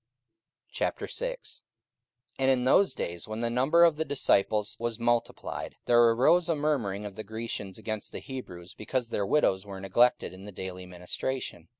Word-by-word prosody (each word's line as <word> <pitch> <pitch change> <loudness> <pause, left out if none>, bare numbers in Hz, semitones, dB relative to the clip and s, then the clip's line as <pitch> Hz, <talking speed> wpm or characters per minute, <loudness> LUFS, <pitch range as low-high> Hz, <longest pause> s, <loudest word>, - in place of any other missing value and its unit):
44:006:001 - - -3 0.8
And 135 0 +3
in 130 -2 +3
those 190 +9 +4
days, 85 +3 -4
when 110 +1 -4
the 115 0 0
number 135 +8 +4
of 165 -3 +5
the 160 - +1
disciples 105 -7 +1
was 115 -1 -2
multiplied, 120 0 -1
there 120 0 +5
arose 160 +9 +4
a 165 - +3
murmuring 120 -10 -1
of 100 -2 -7
the 110 - -6
Grecians 110 -3 -5
against 110 -2 -5
the - - -6
Hebrews, 90 -11 -8
because 120 +2 -3
their 100 -3 -1
widows 95 -8 +2
were 100 -2 -8
neglected 95 +3 +2
in 95 +1 -11
the 105 - -7
daily 95 -1 -6
ministration. 90 +1 -4
115 Hz, 165 wpm, -29 LUFS, 100-130 Hz, 0.8 s, of